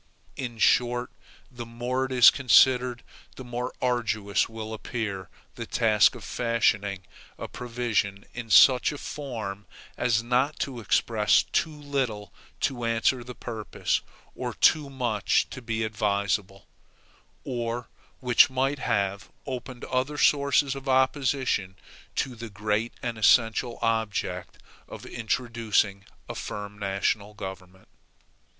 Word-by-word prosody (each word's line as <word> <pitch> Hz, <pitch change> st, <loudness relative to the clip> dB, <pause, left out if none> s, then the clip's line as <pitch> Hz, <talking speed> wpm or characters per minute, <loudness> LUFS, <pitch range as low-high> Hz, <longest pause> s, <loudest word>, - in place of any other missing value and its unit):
In 120 Hz, -3 st, -5 dB
short, 120 Hz, +1 st, +2 dB, 0.4 s
the 120 Hz, -2 st, -7 dB
more 120 Hz, +3 st, -2 dB
it 130 Hz, -, -7 dB
is 125 Hz, -2 st, +8 dB
considered 125 Hz, -2 st, +4 dB, 0.3 s
the 130 Hz, -, -8 dB
more 125 Hz, +1 st, -4 dB
arduous 110 Hz, -5 st, 0 dB
will 110 Hz, -1 st, -6 dB
appear 105 Hz, -4 st, -4 dB, 0.2 s
the -, -, -7 dB
task 110 Hz, -3 st, +3 dB
of -, -, -10 dB
fashioning 105 Hz, -5 st, 0 dB, 0.3 s
a -, -, -6 dB
provision 115 Hz, -5 st, -2 dB
in 120 Hz, -2 st, -7 dB
such 125 Hz, +6 st, +6 dB
a 145 Hz, -, -6 dB
form 110 Hz, -10 st, -6 dB, 0.3 s
as 115 Hz, -2 st, +1 dB
not 125 Hz, +5 st, +1 dB
to 130 Hz, -3 st, -3 dB
express 110 Hz, 0 st, +2 dB
too 160 Hz, -, 0 dB
little 130 Hz, -9 st, -3 dB, 0.3 s
to 130 Hz, -4 st, -1 dB
answer 115 Hz, +2 st, +1 dB
the 125 Hz, +1 st, -9 dB
purpose, 110 Hz, -5 st, -2 dB, 0.3 s
or -, -, -5 dB
too 150 Hz, -3 st, +3 dB
much 120 Hz, -7 st, 0 dB
to 130 Hz, -, -7 dB
be 115 Hz, -1 st, -2 dB
advisable; 100 Hz, -2 st, -1 dB, 0.8 s
or 120 Hz, -1 st, -3 dB, 0.3 s
which 125 Hz, +1 st, +5 dB
might 135 Hz, +2 st, 0 dB
not -, -, -4 dB
have 100 Hz, -2 st, -1 dB, 0.2 s
opened 130 Hz, -1 st, -6 dB
other 130 Hz, +3 st, -1 dB
sources 140 Hz, -1 st, +3 dB
of 135 Hz, 0 st, -6 dB
opposition 130 Hz, -7 st, +1 dB, 0.4 s
to 130 Hz, -, -1 dB
the 115 Hz, 0 st, -8 dB
great 105 Hz, +3 st, -1 dB
and 120 Hz, -2 st, -3 dB
essential 115 Hz, +2 st, +3 dB
object 115 Hz, -2 st, -1 dB, 0.3 s
of -, -, -10 dB
introducing 115 Hz, -4 st, -1 dB, 0.2 s
a -, -, -5 dB
firm 105 Hz, 0 st, -6 dB
national 100 Hz, +1 st, -1 dB
government. 95 Hz, -1 st, -9 dB
115 Hz, 125 wpm, -26 LUFS, 105-125 Hz, 0.8 s, is